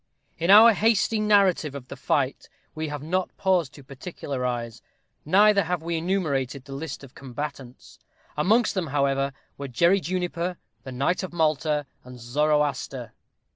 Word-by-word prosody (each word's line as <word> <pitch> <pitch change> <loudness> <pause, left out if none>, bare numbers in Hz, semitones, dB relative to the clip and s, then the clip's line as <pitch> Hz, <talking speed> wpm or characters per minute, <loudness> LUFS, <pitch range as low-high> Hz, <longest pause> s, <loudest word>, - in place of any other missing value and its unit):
In 170 +2 -1
our 220 +3 +9
hasty 220 0 +2
narrative 195 -8 +3
of 130 -2 -8
the 140 - -8
fight 135 0 -1 0.2
we 155 0 -4
have 145 -1 -6
not 185 +4 -2
paused 180 -7 +1
to 140 - -13
particularize, 125 -5 -5 0.4
neither 200 +5 +5
have 175 -1 -2
we 170 0 -2
enumerated, 150 -7 -1
the 135 - -9
list 140 0 -6
of 135 - -12
the - - -14
combatants. 135 -1 -8 0.4
Amongst 215 +10 +2
them, 185 -4 -2
however, 140 -1 0 0.3
were 140 - -4
Jerry 170 +10 +3
Juniper, 180 0 -3 0.2
the 130 - -9
knight 140 +8 0
of 185 -2 -6
Malta, 155 -2 +1 0.2
and 125 0 -12
Zoroaster. 140 -2 -1
150 Hz, 150 wpm, -25 LUFS, 135-180 Hz, 0.4 s, our